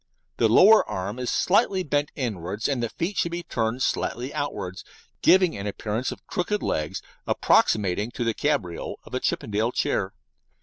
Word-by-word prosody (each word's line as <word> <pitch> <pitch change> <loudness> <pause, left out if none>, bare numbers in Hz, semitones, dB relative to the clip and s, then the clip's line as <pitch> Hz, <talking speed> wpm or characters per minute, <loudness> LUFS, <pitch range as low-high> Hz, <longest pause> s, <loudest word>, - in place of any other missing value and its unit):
The 115 - +3
lower 210 - +7
arm 100 +3 -4
is 125 - -2
slightly 195 -1 +2
bent 145 -2 0
inwards, 105 - -3
and 135 -4 -1
the 115 - -1
feet 180 - -3
should 170 - +1
be 175 0 -3
turned 115 -2 -1
slightly 125 +4 -2
outwards, 105 -11 -4 0.4
giving 185 -2 +5
an 100 +1 -5
appearance 110 +4 -3
of - - -10
"crooked" 205 +4 -2
legs 75 -1 -2 0.2
approximating 105 +1 +2
to - - -2
the 115 -1 +1
cabriole 110 - -2
of - - -15
a - - 0
Chippendale 110 +3 -1
chair. 95 -5 -1
120 Hz, 165 wpm, -25 LUFS, 105-150 Hz, 0.4 s, lower